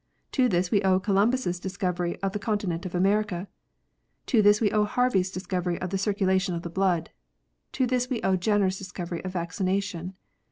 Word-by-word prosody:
To 255 -3 +3
this 175 -1 +1
we 205 - +3
owe 190 -1 +3
Columbus 200 -1 +1
discovery 180 -2 -2
of 195 - +1
the 210 - -3
continent 200 -4 -2
of 180 - -7
America. 195 0 +1 0.8
To 230 -5 +3
this 205 0 +5
we 210 -3 +2
owe 210 -1 +3
Harvey 245 -1 +2
s 185 +1 -1
discovery 180 -2 -2
of 185 - -4
the 195 - 0
circulation 190 -2 +1
of 170 - -5
the 170 - -6
blood. 180 -4 +1 0.6
To 260 - +1
this 250 0 0
we 250 -4 -1
owe 190 0 +3
Jcnncr 205 +2 +2
s 185 0 -1
discovery 175 -2 -6
of 185 0 -5
vaccination. 185 +1 -2
190 Hz, 190 wpm, -26 LUFS, 180-205 Hz, 0.8 s, this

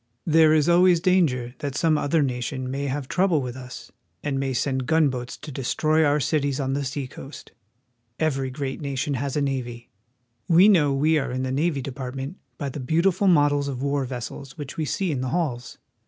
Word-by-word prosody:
There 160 -1 +5
is 155 -1 +3
always 175 0 +5
danger 160 -10 +1
that 140 -2 -4
some 160 0 +2
other 150 +1 +1
nation 130 0 -3
may 140 +1 -3
have 135 0 -3
trouble 180 -2 +2
with 125 -2 -5
us 125 -2 -10 0.3
and 135 -2 -1
may 135 -1 -1
send 130 0 -1
gunboats 140 -6 +1
to 150 - -9
destroy 155 +4 +1
our 145 0 +3
cities 140 -1 0
on 135 -1 -1
U. 140 - -1
S. 140 - -2
Cruiser - - -8
New 145 - -1
York. 130 - -8
the - - -16 0.2
seacoast. - - -15 0.7
Every 135 -4 0
great 135 +1 -5
nation 140 0 -2
has 140 +2 -2
a - - +1
navy. 125 -4 -4 0.6
We 175 +4 +6
know 155 -8 +4
we 150 +3 +2
are 135 -1 -3
in 130 +1 -2
the 130 - -2
Navy 145 0 0
Department 135 +4 -6 0.2
by 140 - -3
the 140 - -7
beautiful 170 +8 +1
models 145 -4 +3
of 135 -2 -4
war 140 0 0
vessels 130 +2 -7
which 145 -2 -7
we 155 - -2
see 185 +4 -1
in 135 -4 -2
the 130 - -2
halls. 130 -6 -2
140 Hz, 210 wpm, -24 LUFS, 130-155 Hz, 0.7 s, We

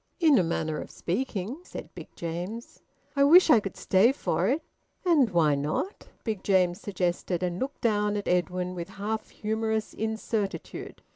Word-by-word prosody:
"In 310 -6 +6
a - - +3
manner 160 -2 -1
of - - -8
speaking," 215 - -3
said - - -9
Big - - -9
James. 175 +8 -5 0.3
"I 280 - +4
wish 330 +3 +7
I 235 - +8
could 195 -2 -6
stay 195 +6 +4
for 190 -8 0
it." 285 +7 +1 0.4
"And 305 -9 +4
why 165 -5 +3
not?" 150 - -2 0.2
Big 215 -5 -3
James 185 -2 +2
suggested, 180 -2 -1
and 180 0 -1
looked 275 +2 -4
down 210 -2 +1
at 205 - -4
Edwin 180 +1 0
with 170 -2 -6
half 215 +2 -3
humorous 220 0 -2
incertitude. 220 -2 -3
205 Hz, 160 wpm, -28 LUFS, 180-230 Hz, 0.4 s, I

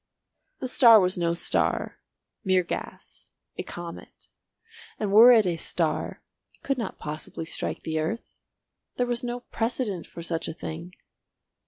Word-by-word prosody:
The 260 - -2
star 235 -3 +7
was 185 -1 +2
no 170 -2 0
star—mere 185 +2 -1
gas—a 170 - -8
comet; 175 -1 -9 0.7
and 205 -2 -1
were 225 +4 +9
it 225 -4 +6
a 175 -2 0
star - - -2 0.3
it - - -35
could 275 -2 -1
not 230 - -4
possibly 155 +2 -6
strike - - -3
the 160 0 -2
earth. 165 +10 -2 0.7
There 245 - +2
was 240 0 -1
no 245 0 -4
precedent 225 -7 -3
for 170 - -9
such 165 -1 -2
a - - -4
thing. 170 +4 -7
185 Hz, 140 wpm, -26 LUFS, 170-235 Hz, 0.7 s, were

